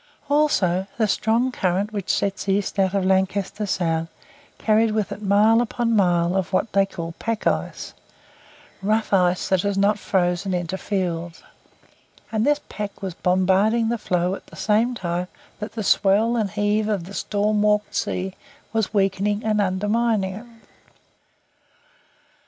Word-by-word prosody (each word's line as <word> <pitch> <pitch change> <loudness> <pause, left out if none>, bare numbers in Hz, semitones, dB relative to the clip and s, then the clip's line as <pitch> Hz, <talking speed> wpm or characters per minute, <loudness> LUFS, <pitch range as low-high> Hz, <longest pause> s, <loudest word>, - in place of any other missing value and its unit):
Also, 195 - +2
the 220 -2 +2
strong 230 +5 +1
current 195 0 -1
which 200 -3 -4
sets 200 0 -1
east 195 0 0
out 190 0 +2
of 195 -2 +1
Lancaster 190 +2 0
Sound 165 -3 0 0.5
carried 220 0 +2
with 215 -3 -1
it 205 - -6
mile 210 +3 +4
upon 235 -1 0
mile 175 -3 +2
of 190 -2 -1
what 205 +3 0
they 195 0 +3
call 170 -3 -6
pack 225 -2 -3
ice - - -2 0.9
rough 215 +2 0
ice 180 -1 +2
that 190 -2 +3
has 200 0 -1
not 205 +1 +2
frozen 180 0 0
into 175 +1 -2
fields; 175 -4 -3 0.9
and 220 +3 0
this 295 0 +2
pack 200 -1 -6
was 190 -2 -3
bombarding 190 +6 +2
the 235 - 0
floe 180 -2 0
at - - -8
the - - -14
same 225 +4 +1
time 175 -3 -3 0.3
that 210 +1 -6
the 220 - -4
swell 205 +5 +3
and 215 -4 0
heave 210 +1 0
of 200 -5 -1
the 190 +4 -10
storm 210 +1 0
worked 210 0 +1
sea 185 +1 -2 0.4
was 220 -1 -1
weakening 200 +2 +1
and 215 -1 +2
undermining 205 +1 0
it. 220 +5 -9
200 Hz, 150 wpm, -23 LUFS, 185-215 Hz, 0.9 s, mile